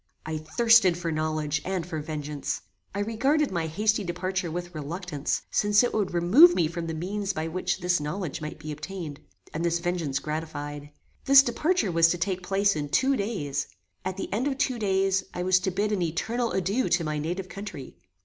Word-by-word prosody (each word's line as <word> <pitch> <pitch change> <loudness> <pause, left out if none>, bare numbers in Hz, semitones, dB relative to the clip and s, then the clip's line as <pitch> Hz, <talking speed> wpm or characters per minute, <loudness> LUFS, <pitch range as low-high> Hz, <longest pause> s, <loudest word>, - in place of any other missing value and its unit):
I 155 0 -3
thirsted 200 +2 +4
for 170 -1 -3
knowledge 155 -1 -1
and 185 -3 -2
for 160 -3 -4
vengeance. 150 -2 -4 0.3
I 200 - 0
regarded 265 +8 +1
my 170 -3 -1
hasty 210 +6 +1
departure 185 0 -2
with 175 +2 -5
reluctance, 155 0 -3
since 205 +2 +4
it 245 - 0
would 210 -3 0
remove 215 - +7
me 165 - +2
from 170 +1 -5
the 165 - -3
means 195 +4 -2
by 160 -2 -3
which 180 +3 -1
this 180 -1 +2
knowledge 150 +2 -4
might 155 0 -5
be 155 0 -7
obtained, 155 -1 -6 0.3
and 160 - -2
this 170 0 +2
vengeance 170 -5 -1
gratified. 145 -1 -5 0.4
This 275 0 +8
departure 275 - +1
was 165 0 +5
to 175 - 0
take 185 +1 -1
place 195 +2 +2
in 145 -1 -3
two 270 - +3
days. 195 - -2 0.4
At 185 0 -3
the 195 - -4
end 240 +7 0
of 270 -2 -1
two 265 -4 0
days 195 -2 +1
I 180 - -2
was 185 0 +4
to 185 - -1
bid 205 +3 -1
an 205 -3 0
eternal 230 +9 -1
adieu 195 +7 0
to 175 -1 +2
my 155 -1 -2
native 175 +5 -3
country. 185 - -8
180 Hz, 195 wpm, -27 LUFS, 155-205 Hz, 0.4 s, This